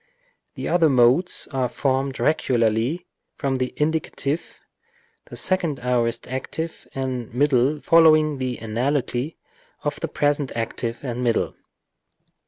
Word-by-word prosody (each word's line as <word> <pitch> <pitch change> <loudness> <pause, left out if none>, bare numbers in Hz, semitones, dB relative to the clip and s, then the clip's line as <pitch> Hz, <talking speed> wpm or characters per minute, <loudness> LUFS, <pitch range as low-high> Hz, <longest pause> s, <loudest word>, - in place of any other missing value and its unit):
The - - -4
other 170 -3 +4
modes 130 +7 +3
are 130 -3 0
formed 135 +1 -1
regularly 120 +2 +1 0.3
from 135 -1 0
the 130 0 -1
indicative, 155 0 -2 0.7
the - - -10
second 170 -7 +1
aorist 120 -2 0
active 160 +6 -5
and 130 -3 -3
middle 140 +1 +3
following 155 -3 +5
the 130 -2 -2
analogy 125 +4 -1 0.5
of - - -2
the - - -2
present 145 -2 0
active 115 +1 -3
and 125 -2 -3
middle. 115 -2 +1
135 Hz, 115 wpm, -23 LUFS, 120-150 Hz, 0.7 s, following